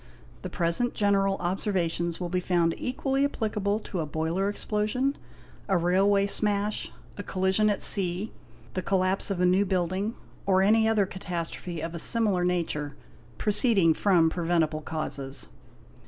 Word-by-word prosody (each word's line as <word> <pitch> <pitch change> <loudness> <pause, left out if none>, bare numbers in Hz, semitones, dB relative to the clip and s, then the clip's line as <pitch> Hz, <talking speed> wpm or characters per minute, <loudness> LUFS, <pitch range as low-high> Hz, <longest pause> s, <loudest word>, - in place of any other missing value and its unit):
The - - -5
present 175 +8 0
general 195 -1 +2
observations 175 -2 -1
will 180 - -3
be 180 +1 -1
found 175 -2 +1
equally 270 +2 -1
applicable 210 -6 -1
to 185 - -5
a 155 - -2
boiler 165 +6 -1
explosion, 215 +7 -1 0.5
a 190 - +3
railway 195 +3 +3
smash, 205 0 0 0.3
a - - -1
collision 190 +2 +1
at 205 - -1
sea, 190 +2 -1 0.4
the 185 - -2
collapse 185 +1 0
of 195 -3 -2
a 180 - +3
new 185 +2 +4
building, 190 +3 -1 0.3
or 190 -1 +4
any 220 +2 +4
other 215 -3 +3
catastrophe 175 -2 -5
of 165 +1 -4
a 170 - -5
similar 210 -3 +3
nature, 165 -5 -1 0.4
proceeding 205 -6 +3
from 170 -3 +3
preventible 165 -3 0
causes. 140 -4 -2
190 Hz, 140 wpm, -27 LUFS, 170-205 Hz, 0.5 s, new